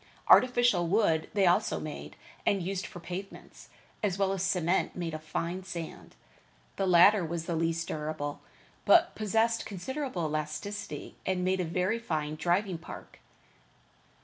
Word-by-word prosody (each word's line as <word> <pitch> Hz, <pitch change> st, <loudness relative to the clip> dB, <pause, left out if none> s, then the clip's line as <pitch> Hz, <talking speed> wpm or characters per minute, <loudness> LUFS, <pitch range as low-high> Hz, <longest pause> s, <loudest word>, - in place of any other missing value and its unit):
Artificial 245 Hz, -8 st, +5 dB
wood 165 Hz, -5 st, +2 dB
they 200 Hz, -2 st, +4 dB
also 175 Hz, 0 st, +2 dB
made 155 Hz, -1 st, -7 dB, 0.3 s
and 195 Hz, -3 st, +1 dB
used 195 Hz, +2 st, -3 dB
for 185 Hz, -, -10 dB
pavements, 180 Hz, +3 st, -8 dB, 0.3 s
as 195 Hz, -3 st, 0 dB
well 195 Hz, -1 st, +1 dB
as 195 Hz, -2 st, -2 dB
cement 185 Hz, -1 st, +1 dB
made 170 Hz, -3 st, -3 dB
of 155 Hz, -, -5 dB
fine 170 Hz, +4 st, -3 dB
sand. 170 Hz, -3 st, -7 dB, 0.6 s
The 195 Hz, -, 0 dB
latter 185 Hz, +3 st, +6 dB
was 165 Hz, 0 st, -3 dB
the 170 Hz, -, -2 dB
least 165 Hz, +1 st, -1 dB
durable, 150 Hz, -1 st, -4 dB, 0.4 s
but 340 Hz, 0 st, +5 dB
possessed 225 Hz, +2 st, +1 dB
considerable 235 Hz, -, -4 dB
elasticity 155 Hz, +7 st, -4 dB
and 185 Hz, -1 st, -1 dB
made 190 Hz, +1 st, +1 dB
a 180 Hz, -, 0 dB
very 180 Hz, +7 st, 0 dB
fine 155 Hz, -9 st, -2 dB
driving 175 Hz, +3 st, 0 dB
park. -, -, -11 dB
180 Hz, 145 wpm, -30 LUFS, 165-200 Hz, 0.6 s, latter